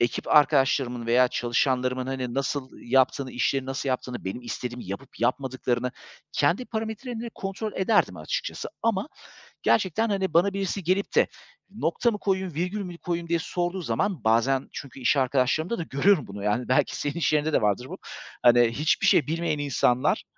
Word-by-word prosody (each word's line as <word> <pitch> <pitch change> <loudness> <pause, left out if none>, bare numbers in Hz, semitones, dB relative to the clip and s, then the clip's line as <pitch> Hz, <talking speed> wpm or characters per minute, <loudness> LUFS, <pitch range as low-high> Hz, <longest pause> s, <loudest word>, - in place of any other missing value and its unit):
Ekip 120 -1 -1
arkadaşlarımın 135 -5 +3
veya 125 +2 +4
çalışanlarımın, 125 +1 0
hani, 130 -2 -3
nasıl 135 0 -2
yaptığını, 130 +1 +2
işleri 135 +2 0
nasıl 135 +1 -3
yaptığını, 125 -1 -3
benim 95 +6 -4
istediğimi 120 0 -5
yapıp 100 +8 -8
yapmadıklarını 125 0 0 0.4
kendi 165 - +2
parametrelerimle 225 +2 -4
kontrol 200 +2 -4
ederdim 205 +3 +2
açıkçası. - - -4
Ama 225 +1 0 0.5
gerçekten, 215 +3 +2
hani, 190 -4 -1
bana 180 +4 +4
birisi 195 0 -2
gelip 185 +4 0
de, - - +5 0.5
"Nokta 235 - +1
mı 210 - -3
koyayım, 190 -3 -1
virgül 180 +7 -2
mü 180 -3 -7
koyayım?" 170 -1 -3
diye 170 0 +1
sorduğu 175 +2 -2
zaman 165 - -1
Bazen 120 +4 +2
çünkü 135 -1 -8
iş 130 +3 +2
arkadaşlarımda 135 - +1
da - - -1
görüyorum 160 +4 +2
bunu. 100 0 -7
Yani, 105 +4 0
belki 130 - +2
senin 145 - -2
işyerinde 155 -2 +1
de - - +3
vardır 105 +3 +1
bu. - - -6 0.5
Hani, 120 0 +7
hiçbir 150 +6 +1
şey 150 - +4
bilmeyen 165 -1 -1
insanlar, 130 -3 +1
140 Hz, 160 wpm, -26 LUFS, 125-185 Hz, 0.5 s, Hani